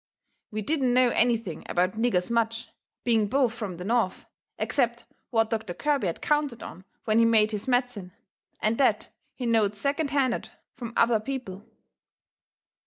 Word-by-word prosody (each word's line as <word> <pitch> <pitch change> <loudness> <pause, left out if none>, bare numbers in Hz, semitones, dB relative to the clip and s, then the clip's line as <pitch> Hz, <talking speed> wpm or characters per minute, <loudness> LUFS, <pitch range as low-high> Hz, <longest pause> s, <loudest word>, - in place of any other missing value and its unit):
We 215 0 -4
didn't 265 -2 +1
know 255 -1 +5
anything 230 -8 0
about 180 +1 +2
niggers 220 -3 0
much, 230 -1 0 0.3
being 225 -3 +2
both 255 0 +2
from 210 -7 -5
the 180 - -6
North, 225 -2 0 0.3
except 240 -3 0 0.2
what 225 -2 +1
Doctor 215 -6 -3
Kirby 285 -8 0
had 170 - -4
counted 295 -5 0
on 185 +2 -10 0.2
when 220 0 +3
he 230 - +5
made 220 -2 +4
his 210 +1 -4
medicine, 245 -7 0 0.5
and 220 +3 0
THAT 225 -6 +2 0.3
he 250 - -5
knowed 220 -3 +2
second 280 +6 -1
handed 270 -4 0 0.3
from 235 -2 -7
other 230 -2 +4
people. 215 -5 -6
230 Hz, 155 wpm, -27 LUFS, 210-250 Hz, 0.5 s, know